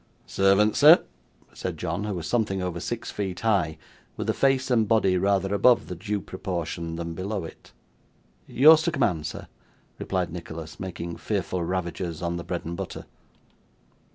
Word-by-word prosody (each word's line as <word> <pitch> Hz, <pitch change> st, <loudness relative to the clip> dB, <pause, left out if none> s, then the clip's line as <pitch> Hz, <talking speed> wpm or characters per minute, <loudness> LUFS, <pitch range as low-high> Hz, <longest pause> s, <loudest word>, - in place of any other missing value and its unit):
'Servant, 100 Hz, +2 st, +3 dB
sir,' 155 Hz, +4 st, +8 dB, 0.5 s
said -, -, -5 dB
John, 90 Hz, +5 st, -3 dB
who 105 Hz, -2 st, -3 dB
was 85 Hz, -3 st, -5 dB
something 105 Hz, -4 st, 0 dB
over 90 Hz, -2 st, -3 dB
six 120 Hz, +6 st, -4 dB
feet 95 Hz, -3 st, -4 dB
high, 95 Hz, -9 st, +1 dB, 0.4 s
with -, -, -4 dB
a -, -, -3 dB
face 135 Hz, -1 st, +1 dB
and 115 Hz, -3 st, +3 dB
body 105 Hz, -4 st, +3 dB
rather 95 Hz, +1 st, +1 dB
above 120 Hz, +4 st, +4 dB
the 90 Hz, -, -4 dB
due 105 Hz, +3 st, -3 dB
proportion 85 Hz, -3 st, -4 dB
than 85 Hz, 0 st, -4 dB
below 95 Hz, +3 st, -3 dB
it. 80 Hz, -, -11 dB, 0.8 s
'Yours 155 Hz, +4 st, +7 dB
to 170 Hz, +1 st, 0 dB
command, 90 Hz, -, 0 dB
sir,' -, -, -8 dB, 0.5 s
replied 90 Hz, -3 st, -2 dB
Nicholas, 80 Hz, -2 st, -8 dB
making 85 Hz, -2 st, -5 dB
fearful 95 Hz, -4 st, -2 dB
ravages 85 Hz, -1 st, -3 dB
on 85 Hz, 0 st, -1 dB
the 85 Hz, -, -5 dB
bread 90 Hz, 0 st, -4 dB
and 85 Hz, +1 st, -4 dB
butter. -, -, -6 dB
95 Hz, 160 wpm, -26 LUFS, 85-105 Hz, 0.8 s, sir